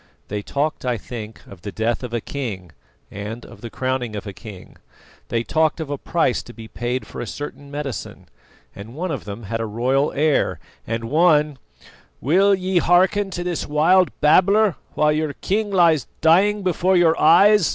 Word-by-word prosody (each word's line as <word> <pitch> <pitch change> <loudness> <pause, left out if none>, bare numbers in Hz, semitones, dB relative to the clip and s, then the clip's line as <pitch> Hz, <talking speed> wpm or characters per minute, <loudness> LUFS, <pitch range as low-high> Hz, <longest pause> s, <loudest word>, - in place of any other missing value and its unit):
They 105 0 -3
talked, 145 +8 -2
I 125 -2 -1
think, 110 0 -9
of 95 -3 -14
the 100 - -6
death 115 +3 -1
of 125 -2 -6
a 120 - -1
king 105 - -6 0.4
and 105 +4 -7
of - - -14
the 115 - -7
crowning 130 -2 -3
of 105 - -6
a 100 - -7
king. 100 -3 -12 0.5
They 115 -1 -1
talked 160 +4 +1
of 155 -3 -5
a 145 - -2
price 165 -7 0
to 120 - -13
be 115 -2 -10
paid 120 +3 -3
for - - -8
a 120 - -5
certain 145 +1 -7
medicine; 145 -3 -6 0.5
and 110 +5 -10
one 180 +3 -3
of 135 -7 -5
them 105 +3 -7
had 115 +3 -4
a 115 - -2
royal 130 +6 0
air, 150 +1 +1 0.3
and 115 +1 -3
one 150 +1 +2 0.3
" - - -28
"Will 195 - +3
ye 185 -1 0
hearken 190 +4 +3
to 175 -2 -4
this 175 -2 -3
wild 170 +5 +4
babbler 195 +6 +4 0.2
while 150 0 +3
your 155 -1 -1
king 210 +6 -1
lies 170 - +3
dying 195 +6 +3
before 185 +1 +2
your 165 -2 +4
eyes?" 195 +4 +6
145 Hz, 185 wpm, -21 LUFS, 115-175 Hz, 0.5 s, eyes